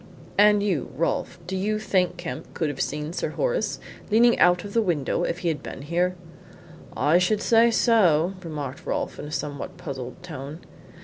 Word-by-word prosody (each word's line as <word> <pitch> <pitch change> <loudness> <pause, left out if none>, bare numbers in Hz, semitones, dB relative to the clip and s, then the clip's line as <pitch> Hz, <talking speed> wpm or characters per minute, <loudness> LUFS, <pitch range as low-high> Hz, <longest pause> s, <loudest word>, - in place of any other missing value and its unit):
"And 210 0 +5
you, 180 -10 0
Rolfe 165 - -1
do 190 +2 -4
you 210 +3 0
think 185 -4 +1
Kemp 175 -1 -7
could 160 - 0
have 145 - -4
seen 150 +2 -3
Sir - - -2
Horace - - -1 0.3
leaning 235 +3 +5
out 180 0 +5
of 200 -1 -8
the 230 - +3
window 170 -9 0
if 170 - -2
he - - +3
had 155 - -2
been 135 - -8
here?" 175 +4 0 0.8
"I 150 +6 +4
should 200 +4 +2
say 230 +1 +5
so," 190 -8 +3
remarked 145 -5 -6
Rolfe, - - -2
in - - -5
a 150 - -8
somewhat 145 -2 -4
puzzled 130 -4 -7
tone. 155 -1 -7
175 Hz, 180 wpm, -25 LUFS, 150-205 Hz, 0.8 s, And